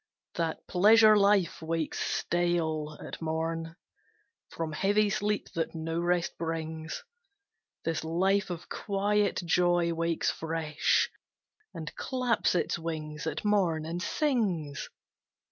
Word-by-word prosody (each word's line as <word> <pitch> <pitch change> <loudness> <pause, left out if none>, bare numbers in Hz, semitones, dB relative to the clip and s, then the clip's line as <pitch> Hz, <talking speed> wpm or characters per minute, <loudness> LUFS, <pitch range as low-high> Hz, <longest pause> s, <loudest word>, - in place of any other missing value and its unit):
That 165 -2 -2
Pleasure 215 +3 +7
life 200 -4 +3
wakes 160 -1 -2
stale 160 -3 0
at - - -8
morn, 165 +1 -2 0.7
From 165 -1 -4
heavy 205 +6 +2
sleep 205 +1 -1
that 165 0 -2
no 165 +1 -2
rest 175 0 0
brings: 160 - -4 0.8
This 165 -1 -1
life 190 +5 +1
of 175 -1 -6
quiet 205 -1 0
joy 175 0 +3
wakes 165 0 0
fresh, 160 -1 0 0.6
And 155 -2 -7
claps 250 -7 0
its 175 - 0
wings 155 -2 -5
at 160 +5 -3
morn, 180 -7 +2
and 170 +2 -4
sings. 190 - -1
170 Hz, 110 wpm, -29 LUFS, 160-195 Hz, 0.8 s, Pleasure